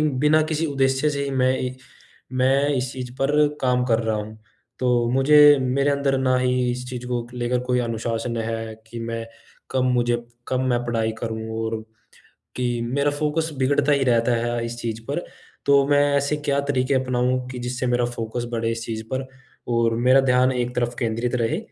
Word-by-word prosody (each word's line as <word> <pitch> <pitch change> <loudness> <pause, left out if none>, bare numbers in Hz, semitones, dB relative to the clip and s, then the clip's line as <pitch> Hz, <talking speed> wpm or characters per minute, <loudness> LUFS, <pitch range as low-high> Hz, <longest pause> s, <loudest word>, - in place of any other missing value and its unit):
बिना 150 +1 +3
किसी 155 +1 -1
उद्देश्य 135 0 +1
से 140 -1 -2
ही 140 - -3
मैं 130 -1 +2
इ 125 - -2 0.6
मैं 135 +2 +3
इस 125 0 -2
चीज़ 125 -2 -6
पर 135 +2 +2 0.3
काम 125 -1 +2
कर 115 -2 +2
रहा 110 -1 0
हूँ, 110 +1 -7 0.4
तो 120 -2 +2
मुझे 145 +2 +7
मेरे 140 +3 +1
अंदर 140 -1 +1
ना 130 -1 +2
ही 125 -1 +1
इस 125 +1 -5
चीज़ 125 -1 -6
को 120 -1 -2
लेकर 125 0 -1
कोई 125 0 +1
अनुशासन 115 0 -2
है 115 0 -3
कि 115 +1 -8
मैं 115 0 -4 0.5
कब 130 -1 +1
मुझे 120 -1 +2 0.3
कब 130 -1 0
मैं 120 -1 +1
पढ़ाई 115 -2 0
करूँ 110 -1 -4
और 110 0 -2 0.8
कि 125 -1 0 0.2
मेरा 140 +2 +1
फ़ोकस 150 +2 -1
बिगड़ता 140 +2 +2
ही 140 -1 +2
रहता 120 -1 +2
है 120 -1 -1
इस 120 0 -6
चीज़ 115 -1 -4
पर। 160 +5 -2 0.4
तो 140 -1 +5
मैं 145 0 +4 0.2
ऐसे 140 +2 0
क्या 145 -1 0
तरीके 130 0 +1
अपनाऊँ 125 -1 0
कि 125 - -6
जिससे 125 +1 -3
मेरा 120 0 +2
फ़ोकस 120 0 -4
बढ़े 115 -1 -1
इस 115 0 -4
चीज़ 110 -1 -4
पर 130 0 -2 0.5
और 115 -1 +2
मेरा 130 +1 +7
ध्यान 130 0 +3
एक 125 0 -2
तरफ 120 0 -1
केंद्रित 120 +1 -1
रहे? 125 +6 0
125 Hz, 190 wpm, -23 LUFS, 120-135 Hz, 0.8 s, मुझे